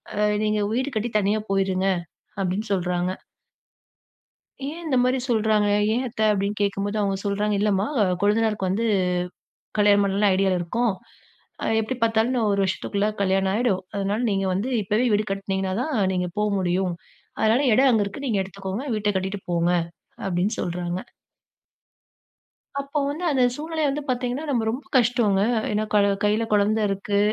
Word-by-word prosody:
அ - - -3 0.3
"நீங்க 210 0 +1
வீடு 260 +4 0
கட்டி 225 +2 -2
தனியா 210 +2 +1
போயிருங்க" 190 -1 +1 0.6
அப்டின்னு 195 +4 -2
சொல்றாங்க. 180 0 -1 1.5
ஏன் 325 +4 -6
இந்த 270 -5 +1
மாரி 255 +1 +2
சொல்றாங்க? 215 -2 +2 0.2
"ஏன் 250 +3 0
அத்த?" 220 -2 -6
அப்டின்னு 200 +1 -2
கேக்கும்போது 200 +1 -1
அவுங்க 195 -1 +1
சொல்றாங்க. 205 +1 0
"இல்லம்மா 205 -1 +2 0.4
கொழுந்தனாருக்கு 210 -1 +1
வந்து 200 +5 0 0.9
கல்யாணம் 205 -1 +5
பண்ணலான்னு 200 +1 +2
ஐடியால 190 -1 +2
இருக்கோம். 225 +5 0 0.7
அ, - - -1 0.2
எப்டி 255 +4 -3
பாத்தாலும் 225 +2 +2
இன்னும் 235 -4 +1
1 200 - +1
வருஷத்துக்குள்ள 200 +2 -1
கல்யாணம் 190 0 +2
ஆயிடும். 210 -4 +1
அதனால 200 +2 -1
நீங்க 195 0 0
வந்து 200 +8 -1
இப்பவே 210 +5 +1
வீடு 210 +1 +2
கட்டுனீங்கனா 195 -1 -2
தான், 305 +2 -2 0.2
நீங்க 180 -1 -1
போ - - +1 0.2
முடியும். 180 0 0 0.5
அதனால, 220 +4 +3
எடம் 265 +4 +5
அங்க 220 -3 +3
இருக்கு. 205 +8 -7
நீங்க 215 -4 +1
எடுத்துக்கோங்க. 195 +4 -5
வீட்ட 210 -1 0
கட்டிட்டு 190 +2 -3
போங்க" 170 0 +2 0.6
அப்படின்னு 190 +3 0
சொல்றாங்க. 175 +1 -3 1.8
அப்ப 280 +1 -2
வந்து, 315 +5 -4
அந்த 265 - +2
சூழ்நிலைய 315 0 -2
வந்து 290 +2 -2
பார்த்தீங்கன்னா, 250 +4 -1
நம்ம 240 -5 +1
ரொம்ப 260 +5 -4
கஷ்டோங்க. 230 -5 +2 0.3
ஏன்னா 210 +1 0
கல 205 -1 +5 0.2
கைல 210 +2 +2
குழந்தை 210 +2 +3
இருக்கு, 200 +1 -1
205 Hz, 150 wpm, -24 LUFS, 195-230 Hz, 1.8 s, கல்யாணம்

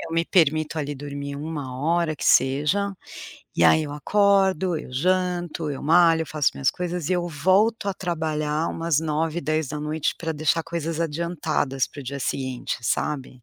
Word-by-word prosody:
eu - - -7
me 165 0 +1
permito 155 -3 +2
ali 145 -1 -3
dormir 140 0 -6
1 145 -4 -5
hora 165 +1 +1
que - - -10
seja, 150 +10 +3 0.6
e 85 - +4
aí 155 - +6
eu 150 - -5
acordo, 190 +1 +2
eu 150 - -10
janto, 175 +1 0
eu 140 - -5
malho, 165 +1 +5
eu - - -7
faço 150 -3 +1
minhas 135 -3 +1
coisas 175 -1 -4
e - - +1
eu 175 -1 -1
volto 190 +8 +2
a 195 - -1
trabalhar 155 -3 -1
umas 165 -2 0
21h, 160 +1 -1
22h 155 0 -1
pra 165 -1 -4
deixar 155 +2 +1
coisas 165 -1 -4
adiantadas 155 -4 -1
para - - -14
o - - -7
dia 140 +2 -5
seguinte, 130 0 -3
sabe. 130 0 -2
155 Hz, 170 wpm, -24 LUFS, 145-170 Hz, 0.6 s, aí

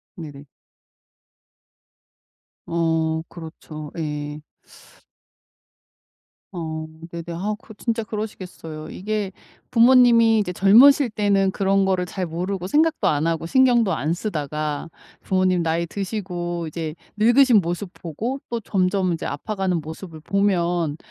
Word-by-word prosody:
네네. 145 -6 -9 2.2
어 160 -1 0
그렇죠. 155 -2 -9
예. 150 -1 -4 2.1
어 160 -3 -5 0.3
네네. 170 0 -6
아 195 +5 -2
그 225 - -12
진짜 230 +1 -2
그러시겠어요. 185 -8 -7
이게 210 0 -3 0.4
부모님이 235 -2 +6
이제 200 -4 -2
젊으실 245 +9 +6
때는 200 -2 +2
그런 195 0 +2
거를 185 -1 +1
잘 185 +1 -4
모르고 180 +3 -3
생각도 315 +7 +2
안 150 +1 +1
하고 165 -1 -1
신경도 240 -2 +4
안 155 +1 -1
쓰다가 155 -5 -3 0.3
부모님 185 -2 +1
나이 165 +1 0
드시고 175 -4 -4
이제 160 0 -4 0.2
늙으신 240 +1 +5
모습 175 +2 -4
보고 220 - -4
또 235 - -2
점점 185 -3 0
이제 165 - -4
아파가는 185 +2 -2
모습을 160 +2 -9
보면 175 -4 0
180 Hz, 240 characters per minute, -22 LUFS, 160-210 Hz, 2.2 s, 부모님이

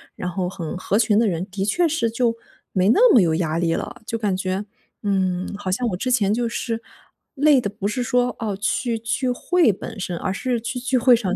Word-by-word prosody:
然 180 - -4
后 180 0 -2
很 170 -4 -5
合 195 +2 0
群 220 -2 +3
的 230 - +3
人， 175 -2 -1
的 190 +1 -2
确 335 - +2
是 290 -7 0
就 230 +1 +1 0.4
没 185 0 +2
那 465 - +6
么 240 - +7
有 165 -3 +2
压 165 -1 -1
力 165 -1 +1
了。 - - -6
就 230 - -2
感 210 -4 0
觉， 190 +2 -2 0.4
嗯， 190 -2 0
好 200 -2 -5
像 235 +7 0
我 185 - -2
之 255 - -2
前 210 -5 +2
就 235 +1 0
是 230 -1 -3 0.5
累 290 -2 +5
的 205 - -2
不 200 0 -4
是 210 +4 -2
说， 245 0 +1
哦， 210 -4 -2
去 230 +3 -1
聚 235 +3 -1
会 330 +3 +3
本 200 +2 -8
身， 180 -2 -3
而 190 - -2
是 250 +2 -1
去 235 +3 -4
聚 255 +1 0
会 250 0 +6
上 200 -5 -1
220 Hz, 245 characters per minute, -22 LUFS, 190-245 Hz, 0.5 s, 么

